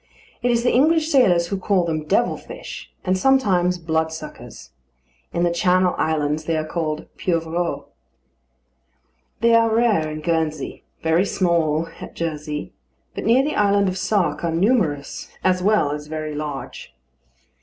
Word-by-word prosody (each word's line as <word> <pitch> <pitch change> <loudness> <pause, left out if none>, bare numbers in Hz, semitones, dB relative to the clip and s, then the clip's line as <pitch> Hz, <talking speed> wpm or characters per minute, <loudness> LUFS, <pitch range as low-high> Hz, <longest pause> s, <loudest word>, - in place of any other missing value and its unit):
It 245 - +1
is 235 -1 +2
the 245 - +2
English 315 +4 +3
sailors 180 -11 +4
who 195 - -2
call 190 -2 +1
them 155 -2 -2
"Devil - - +2
fish," - - -9
and 185 - +2
sometimes 185 -7 +2
Bloodsuckers. 160 - -4 0.6
In 170 - 0
the 175 - +2
Channel 180 +1 +3
Islands 155 0 0
they 165 0 0
are 155 - -2
called 155 -1 -3
pieuvres. 170 0 -1 1.6
They 230 0 +4
are 230 0 +5
rare 220 -8 +2
at 155 0 -6
Guernsey, 160 -3 -2 0.2
very 165 +3 +3
small 165 -4 +1
at - - -9
Jersey; 150 -2 -4 0.4
but - - -5
near 240 +5 +4
the 300 - -1
island 200 -1 +3
of 185 - -3
Sark 185 -7 0
are 170 - +1
numerous 165 - 0
as 185 -1 +2
well 200 -7 +2
as 150 0 -5
very 155 0 -4
large. 145 - -6
170 Hz, 145 wpm, -22 LUFS, 155-200 Hz, 1.6 s, are